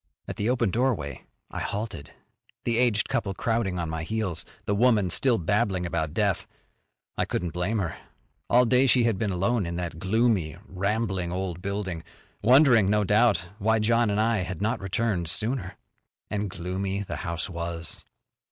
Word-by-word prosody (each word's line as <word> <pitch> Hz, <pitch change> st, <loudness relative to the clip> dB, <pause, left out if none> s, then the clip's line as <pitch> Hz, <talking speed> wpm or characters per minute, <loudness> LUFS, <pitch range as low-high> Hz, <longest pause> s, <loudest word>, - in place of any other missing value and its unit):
At -, -, -6 dB
the 105 Hz, +3 st, 0 dB
open 120 Hz, -5 st, +1 dB
doorway 115 Hz, -, -1 dB, 0.3 s
I -, -, -4 dB
halted, 100 Hz, -9 st, -4 dB, 0.5 s
the 115 Hz, -1 st, +1 dB
aged 120 Hz, -4 st, +3 dB
couple 110 Hz, -6 st, -1 dB
crowding 115 Hz, -4 st, 0 dB
on 85 Hz, -1 st, -2 dB
my 80 Hz, 0 st, -3 dB
heels, 95 Hz, -1 st, -2 dB, 0.2 s
the 100 Hz, -, 0 dB
woman 105 Hz, -4 st, +3 dB
still 125 Hz, +3 st, +3 dB
babbling 95 Hz, 0 st, 0 dB
about 80 Hz, -3 st, -1 dB
death. 100 Hz, +1 st, 0 dB, 0.7 s
I -, -, +2 dB
couldn't 90 Hz, -2 st, -2 dB
blame 90 Hz, +6 st, -1 dB
her. 90 Hz, -5 st, -2 dB, 0.5 s
All 125 Hz, +1 st, +5 dB
day 130 Hz, +3 st, +4 dB
she 125 Hz, -1 st, +4 dB
had 115 Hz, -5 st, +1 dB
been 110 Hz, -, 0 dB
alone 95 Hz, +2 st, 0 dB
in 85 Hz, -, -4 dB
that 85 Hz, -2 st, -4 dB
gloomy, 95 Hz, -5 st, +1 dB
rambling 95 Hz, -2 st, -1 dB
old 90 Hz, -1 st, -3 dB
building, 95 Hz, -4 st, -3 dB, 0.4 s
wondering, 120 Hz, -3 st, +6 dB
no 105 Hz, 0 st, +3 dB
doubt, 105 Hz, -3 st, +3 dB
why 110 Hz, +2 st, +3 dB
John 115 Hz, +1 st, +2 dB
and 100 Hz, +1 st, 0 dB
I 115 Hz, +1 st, +2 dB
had 90 Hz, -2 st, -3 dB
not 110 Hz, +5 st, 0 dB
returned 95 Hz, -3 st, -1 dB
sooner. 100 Hz, -3 st, -1 dB, 0.5 s
And 105 Hz, -1 st, -1 dB
gloomy 95 Hz, +3 st, -3 dB
the -, -, -5 dB
house 85 Hz, +1 st, -3 dB
was. 85 Hz, -2 st, -4 dB
100 Hz, 165 wpm, -26 LUFS, 90-115 Hz, 0.7 s, wondering